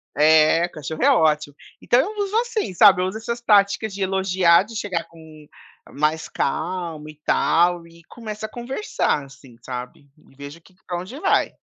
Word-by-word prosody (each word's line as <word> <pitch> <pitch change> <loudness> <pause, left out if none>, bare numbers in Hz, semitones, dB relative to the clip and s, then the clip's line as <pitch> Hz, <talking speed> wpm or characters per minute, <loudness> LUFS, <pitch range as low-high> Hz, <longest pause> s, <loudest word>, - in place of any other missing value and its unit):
eh, 155 +3 +4
cachorro 155 0 -7
é 280 - +5
ótimo. 150 - +1 0.3
Então 245 - +3
eu 415 +10 -2
uso 400 +1 -5
assim, 465 - -2
sabe, 190 -1 +6
eu - - 0
uso 190 +3 -5
essas 235 +2 -5
práticas 205 -1 +2
de 200 - -7
elogiar, 190 -2 +3
de 225 +3 -12
chegar 185 -6 -3
com 160 -2 -16 0.4
mais 155 +2 -1
calmo 160 0 -3
e 155 - -12
tal 175 0 +2
e 170 0 -19
começa 215 +2 -8
a - - -7
conversar, 240 - -2
assim, 135 -2 -17
sabe. 125 +3 -8 0.2
E - - -23
vejo 140 +4 -11
que 185 +2 -23
pra 175 -1 -4
onde 190 +10 -9
vai. 390 - +1
175 Hz, 175 wpm, -22 LUFS, 155-215 Hz, 0.4 s, sabe